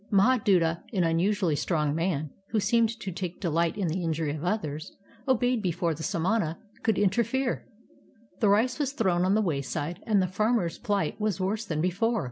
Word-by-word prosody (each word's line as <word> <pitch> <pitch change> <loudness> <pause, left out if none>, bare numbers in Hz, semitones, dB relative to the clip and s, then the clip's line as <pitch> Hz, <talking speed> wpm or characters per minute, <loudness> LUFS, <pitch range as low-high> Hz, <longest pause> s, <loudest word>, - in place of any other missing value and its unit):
Mahaduta, 195 -6 +3
an 185 -4 +2
unusually 170 +1 +1
strong 150 -2 0
man, 155 -3 -1 0.2
who 220 - +1
seemed 230 +2 +3
to 190 - -4
take 180 0 -5
delight 170 0 0
in 195 -4 0
the 175 +3 -2
injury 160 -2 -1
of 155 - -7
others, 165 -5 -3 0.3
obeyed 245 -2 +2
before 175 -3 0
the 160 - -8
samana 170 0 0 0.2
could 220 -4 +1
inter 205 +3 +3
fere. 260 +3 -2 0.7
The 210 - +3
rice 235 +6 +2
was 280 -2 -1
thrown 185 -8 +1
on 190 +2 +3
the 215 - +3
wayside, 150 - -2
and 210 -3 +4
the 185 - +3
farm 215 +6 +1
er's 170 -3 -3
plight 205 -1 -1
was 210 -2 0
worse 205 +4 -1
than 155 -5 -2
before. 215 +7 +1
190 Hz, 185 wpm, -27 LUFS, 165-215 Hz, 0.7 s, and